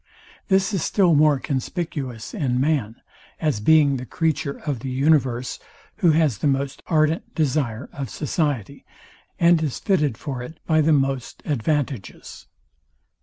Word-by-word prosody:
This 195 +1 +2
is 190 - 0
still 185 -5 +3
more 150 -1 +5
conspicuous 135 - -4
in 125 -4 0
man, 135 -6 0 0.4
as 150 -9 0
being 145 +3 +4
the 125 - -6
creature 155 -4 -1
of 145 -6 -2
the 130 - -5
universe, 130 -2 +1 0.4
who 185 -6 +3
has 155 -8 +2
the - - +1
most 140 0 -1
ardent 155 0 +1
desire 140 -6 -1
of 135 -4 -5
society, 145 - -2 0.6
and 170 -1 +5
is 150 -5 -2
fitted 150 - +1
for 135 -5 -5
it 160 +6 -9
by 155 -1 +3
the 155 +1 +3
most 135 -3 0
advantages. 140 - -3
145 Hz, 140 wpm, -23 LUFS, 130-160 Hz, 0.6 s, more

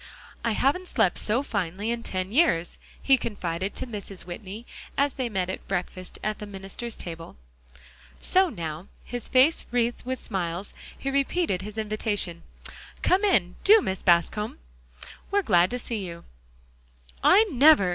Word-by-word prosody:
"I 230 - +1
haven't 290 +11 +1
slept 220 - +2
so 235 +6 +1
finely 200 -1 -2
in 235 0 -2
ten 185 -3 -3
years," 215 - +2 0.2
he 270 -1 +4
confided 190 -4 -3
to - - -2
Mrs. 205 -5 -7
Whitney 200 +5 -8 0.3
as 280 -1 +2
they 255 -3 -2
met 190 -4 -1
at 185 - -6
breakfast 185 -1 -4
at 215 0 -2
the 210 - -6
minister's 195 +4 -6
table. 165 -1 -6 0.8
So 375 0 +3
now, 165 - -5 0.2
his 245 -2 -4
face 265 +5 +4
wreathed 240 0 0
with 260 +1 -2
smiles, 180 -1 -3 0.2
he 275 - -3
repeated 275 - +1
his 210 +2 -8
invitation. 210 -5 -1 0.6
"Come 380 +3 +3
in, 190 - +2
do, 435 +2 +8
Mrs. 190 - -3
Bascom; 180 +4 +2 0.7
we're 405 0 +2
glad 180 - +4
to 250 - -2
see 230 -4 -4
you." 170 -2 -7 1.0
"I 420 - +7
never!" 275 - +6
210 Hz, 150 wpm, -26 LUFS, 185-255 Hz, 1.0 s, do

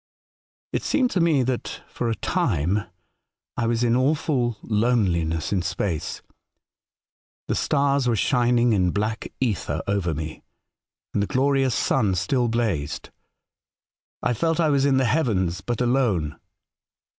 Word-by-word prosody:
'' - - -59
It - - 0
seemed 255 -3 +1
to 185 - 0
me 160 -6 +3
that, 125 -1 -3
for 120 - -3
a 115 - 0
time, 100 +3 0 0.7
I 115 - 0
was 115 +1 +1
in 120 -1 +3
•awful 130 -3 +1
loneliness 100 -8 +1
in 95 - +1
space. 90 -2 -3 1.2
The - - 0
stars 140 -2 +1
were 120 - +2
shining 120 +1 +2
in 90 -3 +2
black 105 +4 -2
ether 115 -7 -1
over 95 -5 0
me, 80 +1 -6 0.7
and 100 - +1
the 100 - 0
glorious 135 -1 +2
sun 105 -8 +1
still 125 - +1
blazed. 110 -12 -2 1.1
I - - +2
felt 165 +7 0
I 160 -2 +3
was 140 -1 +3
in 135 -2 +3
the 130 - +3
heavens, 105 - +1
but 120 -2 -2
alone. 120 - +1
120 Hz, 140 wpm, -24 LUFS, 95-130 Hz, 1.2 s, me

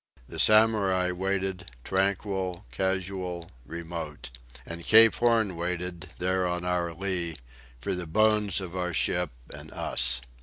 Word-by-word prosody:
The - - -8
Samurai 105 -4 +4
waited, 95 0 -2
tranquil, 95 -1 -1
casual, 95 -2 -3 0.2
remote. 85 -4 -6 0.3
And 85 0 -7
Cape 115 +2 +7
Horn 115 -5 +2
waited, 90 +1 -4
there 95 0 0
on 90 0 -3
our 90 -1 0
lee, 85 -1 -2 0.4
for - - -3
the 90 -2 -4
bones 105 +1 +2
of 95 -2 -7
our 90 -2 -2
ship - - +1 0.2
and - - -10
us. 60 +1 +2
90 Hz, 125 wpm, -27 LUFS, 85-95 Hz, 0.4 s, Cape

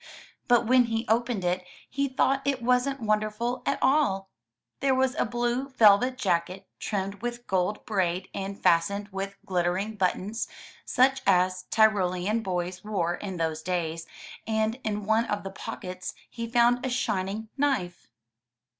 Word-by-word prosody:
But 240 -1 +4
when 250 +1 +5
he 225 0 -2
opened 230 -3 +1
it, 180 +1 0 0.2
he 280 +1 -1
thought 270 +1 +1
it 275 -3 -1
wasn't 250 +2 +1
wonderful 215 +3 0
at - - +1
all. 195 -10 +2 0.5
There 270 -1 +2
was 260 0 +2
a 320 - 0
blue 240 +3 -1
velvet 250 +1 +5
jacket, 185 -4 -1
trimmed 200 -1 -3
with 240 0 -4
gold 190 +2 -1
braid 185 -3 0
and 195 0 -5
fastened 200 +5 +2
with 195 0 -5
glittering 185 +4 -1
buttons, 200 +3 -1 0.4
such 265 +1 +3
as 185 0 +3
Tyrolean 210 -1 +2
boys 180 -2 -3
wore 185 -5 -1
in 190 0 -5
those 160 -1 -1
days, 165 -2 -2 0.4
and 220 +2 0
in 210 -2 -2
one 220 +2 +3
of 205 -2 -2
the 195 - -6
pockets 185 -3 -6 0.2
he 230 -1 -5
found 240 +1 +3
a 260 - -1
shining 215 -3 -2
knife. 270 - -1
210 Hz, 145 wpm, -27 LUFS, 185-240 Hz, 0.5 s, when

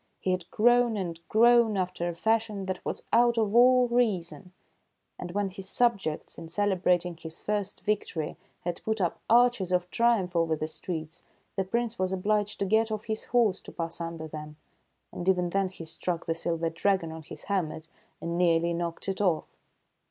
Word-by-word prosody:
He 185 - -1
had 185 -1 -2
grown 240 0 +3
and 170 -4 -4
grown 235 -1 +5
after 180 -2 -1
a 170 - -5
fashion 215 +1 0
that 185 -1 -4
was - - -3
out 240 0 +5
of 215 -2 +1
all 250 +1 +6
reason; 200 -7 0 0.7
and 180 - -5
when 200 -1 -1
his 190 0 -8
subjects, 200 -14 0
in 165 -1 -9
celebrating 180 -2 +1
his 160 0 -7
first 205 -1 -2
victory, 190 -7 -2 0.3
had 175 0 -4
put 220 0 -1
up 175 -3 0
arches 240 -5 +4
of 180 0 0
triumph 230 -7 +2
over 165 -1 +2
the 155 0 -3
streets, 160 0 -4 0.3
the 195 - +1
Prince 235 +3 -2
was 185 0 0
obliged 205 +2 0
to 200 - -1
get 220 +3 +2
off 215 -1 -3
his 220 0 -3
horse 225 -6 +2
to - - -11
pass 165 0 -4
under 165 -1 -5
them. 150 -1 -8 0.6
And 180 +2 -2
even 180 -2 +2
then 195 0 +1
he 175 -3 -10
struck 165 +1 -3
the 165 - 0
silver 165 0 -2
dragon 175 -1 0
on 160 0 -7
his 150 - -10
helmet, 165 -5 -2 0.3
and 170 +1 -3
nearly 170 -1 +3
knocked 170 +1 -4
it 195 +1 -2
off. 180 -6 +2
185 Hz, 180 wpm, -28 LUFS, 170-215 Hz, 0.7 s, all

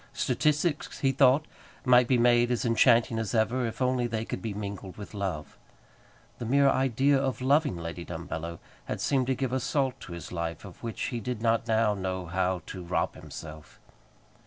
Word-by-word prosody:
Statistics, 150 +1 0
he 135 - +3
thought, 135 +2 +4 0.4
might 125 -1 +6
be 130 - +3
made 120 0 +4
as 125 -1 0
enchanting 115 -1 +4
as 115 +1 -2
ever, 115 +3 +1
if 115 +3 -3
only 125 -1 +1
they 115 -1 -3
could 95 - -5
be 110 - -3
mingled 100 -2 -6
with 105 0 -9
love. 95 -7 -4 0.8
The 120 - -4
mere 140 +4 +4
idea 135 +2 +2
of 135 -2 -1
loving 140 - +2
Lady 85 +1 -6
Dumbello 85 0 -5 0.3
had - - -4
seemed 130 -3 +1
to 130 - +1
give 130 0 -2
a 130 - +1
salt 130 0 -1
to 85 - -9
his 85 - -8
life 85 +2 -4
of 95 - -12
which 115 -2 -4
he 120 - -1
did 115 0 -4
not 115 0 +2
now 110 -2 +3
know 95 -2 -3
how 90 0 -1
to 95 -2 -7
rob 85 - -1
himself. 75 -1 -10
115 Hz, 185 wpm, -28 LUFS, 95-130 Hz, 0.8 s, might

